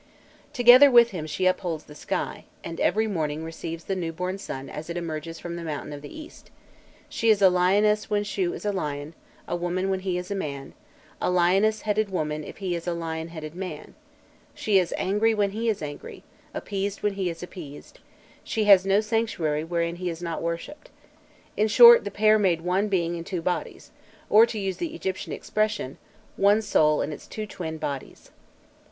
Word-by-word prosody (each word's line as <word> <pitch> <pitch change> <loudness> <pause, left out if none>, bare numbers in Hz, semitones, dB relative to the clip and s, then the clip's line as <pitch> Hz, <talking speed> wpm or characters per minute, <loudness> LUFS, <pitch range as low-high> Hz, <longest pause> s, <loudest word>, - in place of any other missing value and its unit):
Together 250 +1 +8
with 235 -2 +6
him 160 -5 -5
she 185 +4 -2
upholds 175 -4 0
the 150 - -14
sky, - - -4 0.2
and 165 - -6
every 220 +1 +2
morning 160 -6 -2
receives 165 0 -6
the 195 - -2
newborn 180 +2 -3
sun 135 -7 -6
as 155 +4 -8
it 170 - -4
emerges 165 -1 -5
from 170 0 -6
the 170 - -6
mountain 150 -2 -5
of 145 - -8
the 145 - -9
east; 310 - -13 0.6
she 230 - 0
is 215 -2 +5
a 190 -2 +6
lioness 205 +4 +2
when 205 -1 +1
Shû 355 - -1
is - - -9
a 205 - +1
lion, 150 -4 -4 0.3
a - - -2
woman 180 +2 -1
when 190 - 0
he 185 -1 -2
is 180 +2 -6
a - - -1
man, 140 -7 -5 0.5
a - - +1
lioness 190 +5 +3
headed 215 0 0
woman 155 -4 -2
if - - -10
he 190 -3 -3
is 170 0 -5
a 175 - -1
lion 160 -1 -4
headed 155 -2 -8
man; 180 -4 -7 0.6
she 205 -3 +2
is 180 -2 -1
angry 215 +4 +1
when 205 -2 +1
he 225 +3 -1
is 205 -7 -2
angry, 145 -1 -8 0.3
appeased 200 0 -4
when 210 -1 +1
he 190 -2 -2
is 165 0 -7
appeased; 165 -6 -10 0.4
she 220 - -1
has 195 -2 +6
no 195 +2 +4
sanctuary 210 -9 -1
wherein 170 0 -2
he 180 0 -3
is 165 -1 -6
not 170 -2 -4
worshipped. 170 - -5 0.7
In 215 - +2
short, 235 +1 +8
the - - -2
pair 215 +2 +3
made 180 -5 +2
one 185 +4 0
being 175 -4 0
in 165 - -6
two 175 -1 -4
bodies, 180 - -3 0.4
or, 220 +2 +7
to 230 - -5
use 195 -2 -2
the 330 -2 -4
Egyptian 190 - -4
expression, 210 -11 -2 0.4
"one 205 +2 +4
soul 155 -7 +3
in 150 - -4
its - - -11
two 215 - -5
twin 165 -6 -6
bodies." 140 -3 -6
185 Hz, 195 wpm, -25 LUFS, 165-210 Hz, 0.7 s, Together